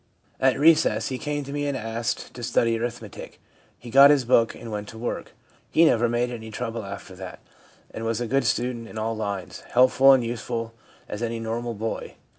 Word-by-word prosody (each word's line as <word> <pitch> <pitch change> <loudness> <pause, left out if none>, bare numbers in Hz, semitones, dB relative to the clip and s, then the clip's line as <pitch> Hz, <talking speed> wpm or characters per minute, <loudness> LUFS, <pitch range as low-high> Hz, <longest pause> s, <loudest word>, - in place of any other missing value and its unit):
At 130 0 +3
recess 150 -8 +4
he 130 -1 -4
came 145 -1 -3
to 140 +1 -7
me 145 0 -1
and 140 -2 -1
asked 115 -1 -3
to 120 - -9
study 115 0 +1
arithmetic. 115 -3 -6 0.4
He 120 - -11
got 140 +2 +9
his 145 -4 +4
book 115 -1 +3
and 115 - -9
went 105 0 -4
to 110 - -10
work. 120 +2 -4 0.4
He 165 - +5
never 120 -5 +3
made 120 +1 0
any 110 -2 -7
trouble 115 +1 -4
after 100 -1 -8
that, 95 -1 -8 0.5
and 110 - -6
was 115 0 -1
a 120 - -1
good 135 +2 +1
student 120 0 -1
in 110 - -10
all 110 +1 -1
lines, 100 -4 -4
helpful 130 +2 +5
and 130 -2 +3
useful 115 0 -4 0.3
as 105 - -6
any 115 -1 -2
normal 115 +1 -3
boy. 110 +2 -4
115 Hz, 200 wpm, -25 LUFS, 110-130 Hz, 0.5 s, got